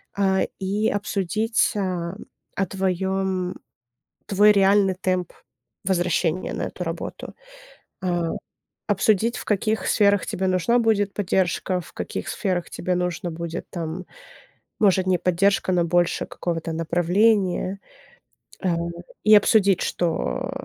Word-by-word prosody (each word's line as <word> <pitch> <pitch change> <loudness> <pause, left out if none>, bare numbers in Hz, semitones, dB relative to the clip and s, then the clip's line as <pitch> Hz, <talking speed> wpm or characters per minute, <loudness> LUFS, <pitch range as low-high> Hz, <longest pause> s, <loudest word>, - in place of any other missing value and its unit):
а, 190 -1 +2 0.2
и 200 +3 0
обсудить, 215 +4 0
э, 180 -4 -2 0.4
о 195 - +1
твоём 190 0 -1 0.7
твой 210 +2 +5
реальный 195 -1 +4
темп 185 -2 -1 0.5
возвращения 180 -1 0
на - - -3
эту 180 - -6
работу. 165 0 -6 0.7
А, 175 -2 0 0.6
обсудить, 215 +3 +2
в - - -6
каких 215 0 0
сферах 200 -2 +3
тебе 190 +1 -1
нужна 185 +6 +2
будет 205 -3 +1
поддержка, 185 -1 0
в - - -14
каких - - -5
сферах 185 -4 -2
тебе 180 +1 -2
нужно 180 -1 -2
будет, 170 +1 -5
там, 170 +1 -5 0.8
может, 190 -3 +3
не 185 -1 +2
поддержка, 185 +2 +2
но 175 -1 +2
больше 175 0 +1
какого-то 165 -1 -4
направления. 180 +4 +1 0.9
Э, 180 -2 +2 0.5
и 215 +1 +7
обсудить, 200 -2 +4
что 165 - -1
185 Hz, 115 wpm, -23 LUFS, 175-200 Hz, 0.9 s, и